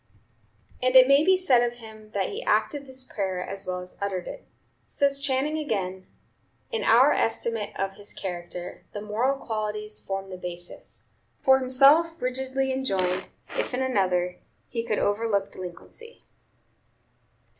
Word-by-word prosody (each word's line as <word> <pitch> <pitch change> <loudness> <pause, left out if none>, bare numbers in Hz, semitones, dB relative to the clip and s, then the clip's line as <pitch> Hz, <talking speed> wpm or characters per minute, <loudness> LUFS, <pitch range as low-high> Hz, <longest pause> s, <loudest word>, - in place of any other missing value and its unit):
And 255 +1 +1
it 255 0 +10
may 275 +2 +6
be 375 +2 +5
said 270 -10 +4
of 240 0 0
him 220 -2 -13
that 195 -2 0
he - - -4
acted 220 +7 0
this 260 0 -6
prayer 190 -6 -3
as 195 -1 -5
well 180 0 -2
as 180 - -11
uttered 195 -3 -2
it. - - -8 0.4
Says 280 -1 +1
Channing 280 +3 0
again: 190 -10 -3 0.6
"In 460 - -1
our 255 +6 +6
estimate 225 -1 -1
of 195 0 -2
his 205 0 -5
character, 175 -1 -6
the 205 - -5
moral 230 +6 0
qualities 215 -3 -3
form 195 0 -5
the 185 - -6
basis; 175 -1 -8 0.3
for 265 0 +6
himself 285 +6 +5
rigidly 265 +1 -1
enjoined; 190 -8 0 0.3
if - - -1
in 260 - 0
another, 180 -7 +1 0.3
he 230 - -2
could 230 -2 -1
overlook 205 -1 0
delinquency. 185 - -9
220 Hz, 145 wpm, -26 LUFS, 195-265 Hz, 0.6 s, it